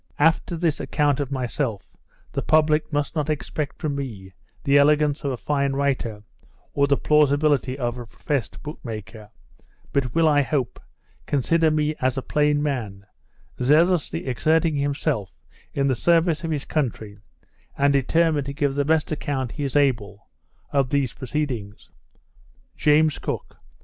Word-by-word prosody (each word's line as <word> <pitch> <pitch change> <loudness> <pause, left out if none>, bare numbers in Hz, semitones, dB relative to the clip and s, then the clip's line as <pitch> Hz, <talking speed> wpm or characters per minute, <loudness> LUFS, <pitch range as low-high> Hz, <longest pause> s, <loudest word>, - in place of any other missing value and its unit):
After 165 +3 +2
this 160 -3 0
account 145 -2 +1
of 140 -1 -3
myself, 125 -4 -2 0.4
the - - -2
public 155 0 +2
must 145 +1 -1
not 155 -1 -1
expect 150 -1 -3
from 155 -4 -2
me 105 -9 -6 0.3
the 140 -1 +4
elegance 150 +1 +3
of 140 - -1
a 125 - -3
fine 140 +1 0
writer, 130 -6 -1 0.5
or 140 0 +2
the 140 -1 +3
plausibility 145 -3 +2
of 120 -2 -2
a 120 - -8
professed 135 +3 -4
book 150 0 -7
maker; 110 -2 -8 0.6
but 130 -4 0
will, 165 -1 +4
I 145 -2 +4
hope, 135 -3 -2 0.5
consider 160 +4 +2
me 155 0 +1
as 130 0 +1
a 135 - -2
plain 150 0 +1
man, 110 -9 -3 0.6
zealously 160 +6 +2
exerting 155 +5 +1
himself 140 - -1 0.4
in 140 - 0
the 135 - +2
service 165 +5 +2
of 165 - -2
his 150 -3 -2
country, 110 -8 -3 0.6
and 140 0 +3
determined 150 +1 +2
to 140 - -4
give 140 -2 0
the 145 +1 +1
best 155 +2 +1
account 135 -5 -2
he 145 - -5
is 135 -1 -3
able 115 -8 0 0.4
of 135 -2 +1
his 140 -4 +1
proceedings. 130 -7 -4 0.8
JAMES 155 0 +3
COOK. - - -5
140 Hz, 150 wpm, -23 LUFS, 130-150 Hz, 0.8 s, the